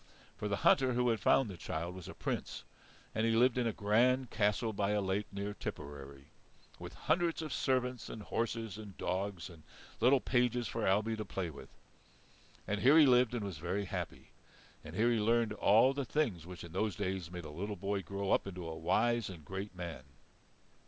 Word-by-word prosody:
For 105 - -4
the 100 - 0
hunter 130 -2 +5
who 125 0 +2
had 115 -2 +1
found 130 +6 +4
the 95 -4 -7
child 85 +2 -4
was 90 -2 -9
a - - -8
Prince, - - -4 0.5
and 110 - 0
he 115 0 +3
lived 120 +2 +4
in 125 -2 +1
a - - +1
grand 120 +5 +2
castle 105 +2 +1
by 100 0 0
a 105 - +2
lake 100 +1 -1
near 100 +1 -4
Tipperary, 70 -5 -8 0.5
with - - -8
hundreds 170 -1 0
of 155 -4 -4
servants 125 -2 0
and 110 - -7
horses 115 -3 -2
and 105 -3 -10
dogs 95 -1 -2
and 85 -3 -13 0.4
little 130 +3 +5
pages 125 -1 +1
for 115 -1 -2
Ailbe 105 +4 +2
to 110 - -4
play 95 -4 -4
with. 70 - -11 1.0
And 105 0 -1
here 140 +5 +7
he 155 - +9
lived 125 -2 +4
and 115 - -2
was 95 -6 -5
very 95 +5 -2
happy; - - -6 0.5
and - - -9
here 115 +2 +3
he 115 - +2
learned 115 0 +2
all 110 +5 +5
the 140 0 -2
things 115 - -1
which 90 -1 -8
in 85 - -9
those 100 +1 -1
days 90 -2 -3
made 90 -2 -7
a 75 - -7
little 100 +7 -4
boy 100 +1 -2
grow 100 +1 -3
up - - +2
into 90 -3 -6
a 80 - -5
wise 115 +8 +1
and 85 -5 -10
great 95 +1 -6
man. 85 -5 -6
105 Hz, 200 wpm, -34 LUFS, 95-120 Hz, 1.0 s, he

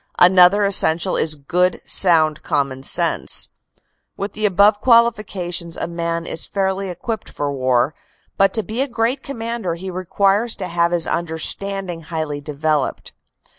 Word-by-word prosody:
Another 180 +3 +6
essential 185 -2 +2
is 155 -1 0
good, 180 +6 0
sound 160 -4 +3
common 140 -2 -1
sense. - - +1 0.7
With 200 +1 -4
the 215 0 0
above 205 +2 +4
qualifications 200 -8 +1
a - - -2
man 170 0 -3
is 165 - -3
fairly 195 0 -2
equipped 215 +5 -5
for 145 -1 -3
war, 130 +1 +1 0.4
but 195 0 +3
to 220 - +1
be 225 +5 -3
a 275 - +1
great 240 +2 -1
commander 230 -9 -4
he 185 +2 -7
requires 195 +5 0
to 185 - -5
have 170 0 +1
his 175 -2 +3
understanding 175 +2 -3
highly 155 -3 -4
developed. 150 -1 -2
180 Hz, 140 wpm, -19 LUFS, 160-200 Hz, 0.7 s, Another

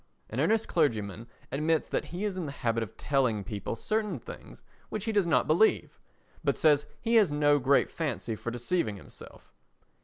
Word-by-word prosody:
"An - - -3
Earnest 220 0 +2
Clergyman" 115 - 0 0.2
admits 155 +3 +1
that - - -2
he 180 +4 -4
is 200 -3 -2
in 180 -4 -3
the - - -4
habit 115 -4 -1
of 110 - -6
telling 125 -8 +1
people 105 0 -4
certain 210 - -1
things 115 - -11 0.3
which 215 -1 -4
he 225 - 0
does 205 -5 +2
not 165 - +3
believe, 170 +8 +2 0.4
but - - +1
says 150 -2 +3
he 230 0 +2
has 205 -8 +4
no 145 0 +3
great 140 +2 +3
fancy 130 -8 -3
for 110 +3 -5
deceiving 120 - -1
himself. 95 - -14
145 Hz, 180 wpm, -29 LUFS, 115-180 Hz, 0.4 s, has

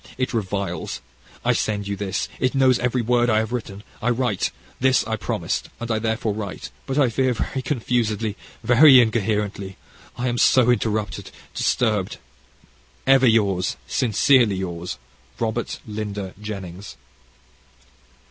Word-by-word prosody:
It 130 0 -1
reviles. 100 -3 -3 0.5
I - - +4
send 100 -2 -1
you 100 - -2
this. 100 -1 -2
It 130 +1 0
knows 130 -2 +4
every 125 0 0
word 120 +1 +2
I 110 - +3
have 110 +1 0
written 105 -4 -5 0.2
I 120 - +1
write. 120 -5 0 0.3
This 130 0 +3
I 110 - -1
promised, 105 -4 -3
and 120 0 -4
I 110 - +1
therefore 110 -1 -1
write, 100 -2 -6 0.2
but 135 - -2
I 140 -4 +4
fear 130 +2 +1
very 130 +3 -3
confused, 120 -4 -1 0.4
very 130 +2 +8
incoherently. 105 -4 0 0.4
I 125 +1 -1
am 120 -1 -1
so 125 -2 +5
interrupted, 105 -4 -1 0.2
disturbed. 105 -6 0 0.9
Ever 135 -1 +5
yours, 100 -5 +2
sincerely 120 -1 +3
yours, 90 -2 -4 0.4
Robert 115 +1 -2
Lynder 105 -3 -5
Jennings. 95 -2 -7
110 Hz, 135 wpm, -23 LUFS, 100-125 Hz, 0.9 s, very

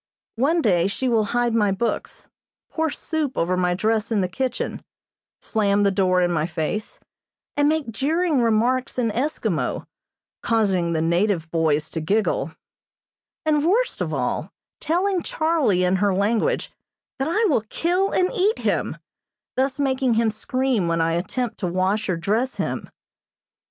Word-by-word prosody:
One 315 +7 +2
day 180 -4 +3
she 255 +6 -2
will 225 -3 +2
hide 240 +2 0
my 210 -3 +3
books, 205 +5 -3 0.4
pour 320 0 0
soup 300 -2 -3
over 180 +2 +1
my 180 -1 +1
dress 220 +3 0
in 210 -3 +2
the 185 - 0
kitchen, 250 +7 -3 0.6
slam 205 -2 +1
the 200 - +3
door 185 -2 +2
in 175 - +1
my 155 -1 0
face, 170 +5 -4 0.6
and 290 0 +3
make 310 -6 -1
jeering 305 - +1
remarks 240 +4 +1
in 235 -3 +1
Eskimo, 270 +8 -1 0.6
causing 190 -7 +1
the 160 -1 0
native 170 -1 +1
boys 155 -2 +1
to 160 - -3
giggle; 165 -4 0 0.9
and 300 -2 +2
worst 440 +9 +1
of - - -1
all, - - -2 0.3
telling 365 +3 0
Charlie 315 - +1
in 180 +1 +2
her 200 0 +2
language 210 +4 0 0.5
that 270 - 0
I 425 +8 +2
will 285 - +2
kill 360 +4 +1
and 365 0 +1
eat 410 +4 +2
him, - - -1 0.6
thus 265 +1 0
making 260 -3 +1
him 225 -1 +2
scream 250 -2 -1
when 165 0 0
I 165 0 +2
attempt 225 +8 -2
to 185 - -1
wash 190 +4 0
or 180 - +1
dress 220 +10 0
him. - - -3
220 Hz, 155 wpm, -23 LUFS, 185-270 Hz, 0.9 s, day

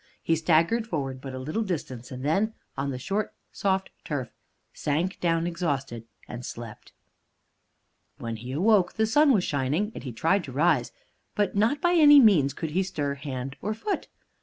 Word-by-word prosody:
He 165 - +2
staggered 165 +8 +2
forward 135 - -3
but 135 -1 -7
a - - -5
little 155 +12 -2
distance, 140 - -4
and 130 +1 -7
then, 200 +9 +1 0.2
on 140 +1 -2
the 130 - -3
short, 200 +10 -2 0.2
soft 190 -1 -1
turf, 130 -6 -4 0.4
sank 165 +6 -1
down 165 -1 +1
exhausted 140 -9 -3 0.2
and 120 0 -7
slept. 115 -3 -9 1.3
When 115 -1 -5
he 125 +4 -6
woke, 195 +2 +3
the 220 - +1
sun 290 +6 +4
was 205 -8 +3
shining, 150 +8 0
and - - -8
he 130 - -5
tried 165 - +1
to 135 - -8
rise; 145 -2 +2 0.4
but 205 -1 0
not 225 +8 +2
by 350 0 +3
any 295 -4 +8
means 180 - +5
could 160 -3 -4
he 185 +5 +1
stir 150 -7 -2
hand 135 -2 -6
or 215 +1 -2
foot. 400 - -3
160 Hz, 175 wpm, -26 LUFS, 135-205 Hz, 1.3 s, any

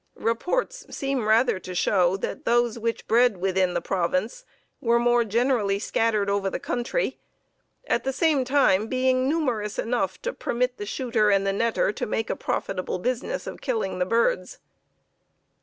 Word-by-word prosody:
Reports 360 - -1
seem 270 -5 -2
rather 225 -1 +3
to 185 -1 -8
show 180 +1 +2
that - - -5
those 240 -1 +1
which 230 0 -3
bred 235 -2 +4
within 185 -1 0
the 175 - 0
province 185 +5 -1 0.4
were 235 -1 +3
more 240 0 +3
generally 225 -2 +1
scattered 215 0 0
over 200 -1 0
the - - -4
country, 245 - -2 0.7
at - - 0
the 270 - -1
same 295 -1 +2
time 250 -6 +3
being 255 +1 +1
numerous 245 -10 -1
enough 240 +1 -1
to - - -2
permit 250 +1 -1
the 205 - -6
shooter 230 -3 +1
and 195 -1 +3
the 195 - +2
netter 225 -1 +1
to - - -3
make 225 +1 -2
a - - -1
profitable 185 -1 -3
business 250 - -3
of - - -8
killing 220 -8 -2
the - - +3
birds. 480 - +1
230 Hz, 160 wpm, -25 LUFS, 200-255 Hz, 0.7 s, bred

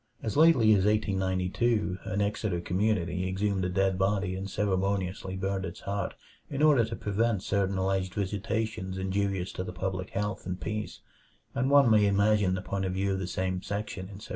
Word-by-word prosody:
As 110 - -2
lately 150 -8 +6
as 100 -3 +4
1892 95 0 0
an 100 +2 -1
Exeter 100 -3 -1
community 90 -1 0
exhumed 95 0 0
a - - 0
dead 95 0 +1
body 95 -1 +1
and 95 +1 -5
ceremoniously 95 -1 -1
burnt 95 0 -2
its - - -6
heart 100 0 -3 0.3
in 140 +1 -1
order 145 -6 +6
to 115 +1 -3
prevent 105 -1 0
certain 100 -1 0
alleged 95 -1 -1
visitations 100 -1 -2
injurious 95 -1 -1
to 90 - -4
the 90 - -6
public 95 +1 -3
health 105 -2 -3
and 90 0 -3
peace, 105 +3 -4 0.5
and 130 +2 0
one 140 -4 +6
may 105 -2 +5
imagine 100 -1 +3
the 95 - -4
point 95 -1 -2
of 95 - -2
view 95 +1 0
of 95 - -2
the 95 - -3
same 95 0 -2
section 100 -2 -4
in 95 0 -10
1768. 105 - -11
95 Hz, 185 wpm, -29 LUFS, 95-105 Hz, 0.5 s, lately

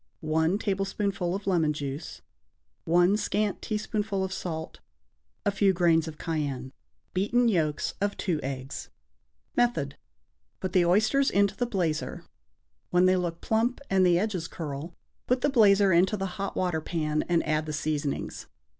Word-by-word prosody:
1 160 +3 +1
tablespoonful 195 -2 -1
of 200 - -6
lemon 165 -6 +2
juice. 145 +1 -6 0.6
1 175 +4 +4
scant 210 -1 -1
teaspoonful 210 -2 -2
of 190 0 -3
salt. 160 -4 -5 0.7
A 205 - +3
few 195 -1 +3
grains 170 -2 +3
of 155 -1 -7
cayenne. 140 -5 -3 0.4
Beaten 230 +6 +2
yolks 160 -8 0
of 205 0 0
2 170 -6 -1
eggs. 135 0 -5 0.7
Method. 160 -14 +1 0.6
Put 185 -1 -4
the 180 -3 +4
oysters 220 +9 +3
into 200 0 +2
the 245 - -1
blazer. 170 -8 -2 0.6
When 180 +1 +4
they 185 0 +5
look 175 -2 -2
plump 230 +3 +1
and 190 -1 +4
the 175 -1 +5
edges 185 -4 -1
curl, 155 +1 -6 0.3
put 250 0 +2
the 290 - +3
blazer 200 -6 +5
into 185 +5 +3
the 195 - -2 0.2
hot 200 - -3
water 175 -4 0
pan 155 -2 -1
and 170 -1 +2
add 155 0 0
the - - -2
seasonings. 150 -1 -3
180 Hz, 150 wpm, -28 LUFS, 155-200 Hz, 0.7 s, they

